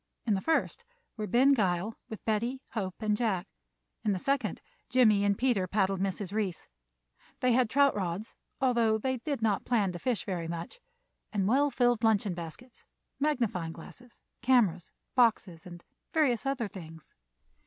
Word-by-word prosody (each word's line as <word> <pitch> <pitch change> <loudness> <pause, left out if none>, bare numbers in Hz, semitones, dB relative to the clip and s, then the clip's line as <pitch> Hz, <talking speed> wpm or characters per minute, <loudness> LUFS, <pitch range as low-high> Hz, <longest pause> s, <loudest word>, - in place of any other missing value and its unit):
In 220 - +2
the 190 - 0
first 325 - 0 0.3
were 215 -2 -4
Ben 260 +5 +5
Gile 195 -2 0 0.2
with 220 - -8
Betty, 230 +4 0
Hope, 190 -5 -3
and 215 -1 +1
Jack. 210 -6 -1 0.6
In 210 - +2
the - - -1
second 255 -1 -1 0.3
Jimmie 215 -5 +4
and 200 -1 +2
Peter 240 -8 +1
paddled 195 0 +1
Mrs. 195 0 -2
Reece. 205 -6 -2 0.7
They 255 - +2
had 245 -1 +3
trout 280 +2 +4
rods, 190 +2 -4 0.2
although 235 -5 +3
they 260 +4 -1
did 260 -1 -3
not 210 -3 +1
plan 210 -6 +1
to 175 - -7
fish 245 -2 -1
very 175 -4 -3
much, 170 - -6 0.5
and 195 -3 0
well 280 +6 +3
filled 245 -3 +2
luncheon 210 -3 +3
baskets, 175 +9 -9 0.4
magnifying 235 - 0
glasses, 240 +9 -13 0.2
cameras, 230 -9 +2 0.2
boxes, 210 -9 +2
and 175 -1 -11 0.3
various 275 -5 +2
other 270 -5 -1
things. 165 -5 -11
215 Hz, 155 wpm, -30 LUFS, 190-250 Hz, 0.7 s, Ben